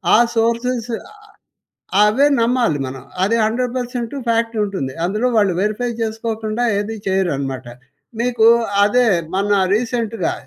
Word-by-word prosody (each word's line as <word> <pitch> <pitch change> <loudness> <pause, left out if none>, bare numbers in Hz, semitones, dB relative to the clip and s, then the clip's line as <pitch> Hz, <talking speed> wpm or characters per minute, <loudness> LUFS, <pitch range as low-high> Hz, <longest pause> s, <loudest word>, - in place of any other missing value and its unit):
ఆ - - +7 0.2
సోర్సెస్ 235 +1 0 1.1
అవే 215 +7 +4
నమ్మాలి 230 - +1
మనం. 130 0 -7 0.2
అది 215 +5 +2
100% 245 +2 -2
ఫ్యాక్ట్ 230 0 +1
ఉంటుంది. 190 -10 -4
అందులో 210 +7 0
వాళ్ళు 205 -3 +3
వెరిఫై 215 +4 -1
చేసుకోకుండా 225 0 -3 0.2
ఏది 210 +2 -3
చేయరనమాట. 140 -9 -1 0.5
మీకు 235 -2 +2 0.4
అదే 245 +5 +3 0.3
మొన్న 200 +2 +1 0.2
రీసెంట్‌గా 225 -4 -1
225 Hz, 110 wpm, -19 LUFS, 200-240 Hz, 1.1 s, ఆ